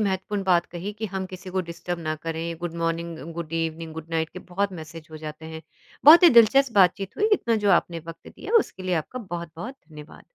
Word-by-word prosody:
महत्वपूर्ण 200 0 -1
बात 175 -2 +3
कही 180 +4 -6
कि 215 +1 -5
हम 190 -1 -3
किसी 185 0 -9
को 190 +1 0
डिस्टर्ब 170 +1 -5
ना 155 -2 -2
करें। 165 +1 -4
Good 175 -1 -4
morning, 165 0 -2 0.2
good 165 -1 -6
evening, 165 0 -3
good 160 0 -8
night 160 -1 0
के - - -9
बहुत 195 +2 -2
मैसेज़ 160 -1 -9
हो 155 - -8
जाते 155 0 -8
हैं। 160 - -8 0.4
बहुत 320 +5 +10
ही 345 - +10
दिलचस्प 240 +3 +5
बातचीत 195 0 +3
हुई। 425 +1 +2
इतना 235 - +2
जो - - +5
आपने 170 -3 +2
वक़्त 165 0 -10
दिया, 405 - -8
उसके 190 - -4
लिए 185 -1 0
आपका 165 +10 -3
बहुत-बहुत 175 - -7
धन्यवाद। 150 -1 -13
175 Hz, 215 wpm, -25 LUFS, 165-195 Hz, 0.4 s, बहुत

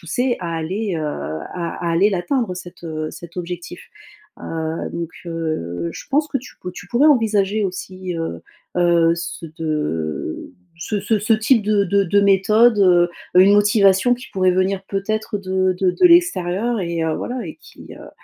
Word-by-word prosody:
pousser 240 +10 -1
à 170 -1 -4
aller, 190 +5 -3
heu, 160 - -3
à 145 - -5
à - - +1
aller 175 +5 +4
l'atteindre 200 +2 -1
cet, 180 -1 -10
heu, 155 -2 -4
cet 170 +1 -12
objectif. 175 0 -6 0.6
Heu, 160 0 -4
donc 170 -1 -4 0.2
heu, 90 - -3
je - - -9
pense 295 +2 +2
que 275 - -1
tu 255 - -14
pou 180 - -6
tu 180 0 -11
pourrais 245 +8 +3
envisager 215 -6 +2
aussi, 185 -1 -5
heu 165 - -4 0.4
heu, 170 -1 +4
ce 170 0 -6
de 150 - -3 0.3
ce 205 +4 -3
ce 215 +2 +1
ce 215 +3 +1
type 220 +1 +3
de 205 -1 +2
de 200 +2 +2
de 200 +3 +3
méthode, 210 +4 +4
heu, 175 -3 +4 0.3
une 195 +2 +6
motivation 205 +2 +4
qui 245 +1 -11
pourrait 185 -1 +2
venir 190 +1 0
peut-être 215 +2 -2
de 185 -1 0
de 185 -1 +3
de 360 - +4
l'extérieur, 235 - +2
et 170 -2 -2
heu, 160 -1 0
voilà 245 -1 -4
et 160 - -8
qui - - -15
heu - - -12
185 Hz, 175 wpm, -20 LUFS, 170-210 Hz, 0.6 s, une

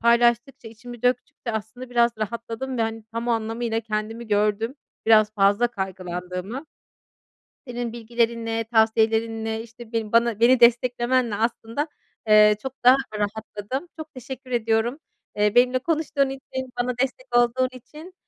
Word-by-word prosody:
paylaştıkça 235 +1 +2
içimi 240 +1 -11
döktükçe 250 -1 -1
aslında 220 +4 -6
biraz 235 -1 +4
rahatladım 230 +4 -4
ve - - +2
hani 225 -1 -3
tam 230 +1 -3
anlamıyla 225 0 -1
kendimi 220 +1 -4
gördüm; 210 +4 +1 0.3
biraz 215 -1 +5
fazla 205 +3 +4
kaygılandığımı. 185 - -5 1.0
Senin 240 -1 -4
bilgilerinle 230 -1 -1
tavsiyelerinle 225 0 +1
işte 230 -2 -6
bana, 230 -2 +3
beni 240 +2 +5
desteklemenle 240 -1 +3
aslında, 230 +6 -2 0.4
eee, 210 0 +7
çok 265 -1 -5
daha 250 +2 +8 0.2
rahatladım. 215 +7 -4
Çok 310 0 -8
teşekkür 260 0 -9
ediyorum, 230 +3 +1 0.4
eee, 210 +1 +2
benimle 250 +1 +4
konuştuğun 295 -2 0
için 260 -1 -6
bana 245 0 -2
destek 385 - -3
olduğun 240 +2 +3
için, 305 +8 -12
235 Hz, 125 wpm, -24 LUFS, 220-250 Hz, 1.0 s, daha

